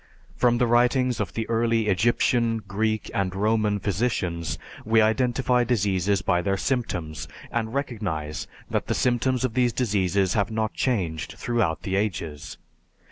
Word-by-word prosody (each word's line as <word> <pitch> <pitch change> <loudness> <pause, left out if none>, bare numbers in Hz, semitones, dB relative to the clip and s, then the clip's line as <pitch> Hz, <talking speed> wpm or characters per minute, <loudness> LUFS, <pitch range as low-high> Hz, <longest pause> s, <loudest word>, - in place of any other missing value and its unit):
From 120 -1 +3
the 125 - +3
writings 125 +1 +3
of - - -2
the 110 -1 -3
early 115 -1 +1
Egyptian, 115 +3 +2
Greek, 110 +1 -1
and 95 -1 -1
Roman 105 0 +1
physicians 90 -5 -1 0.3
we 110 +1 +3
identify 125 +2 +2
diseases 100 -5 +1
by 90 0 +2
their 100 +2 0
symptoms, 95 - -2 0.2
and 115 +1 -2
recognize 95 - -3 0.2
that - - -2
the - - 0
symptoms 125 +1 +1
of 125 - -2
these 125 -1 +2
diseases 100 -5 +1
have 100 -2 +1
not 110 -1 -1
changed 90 -11 -1
throughout 110 -10 0
the 95 - -2
ages. 85 -7 -3
110 Hz, 140 wpm, -25 LUFS, 95-120 Hz, 0.3 s, From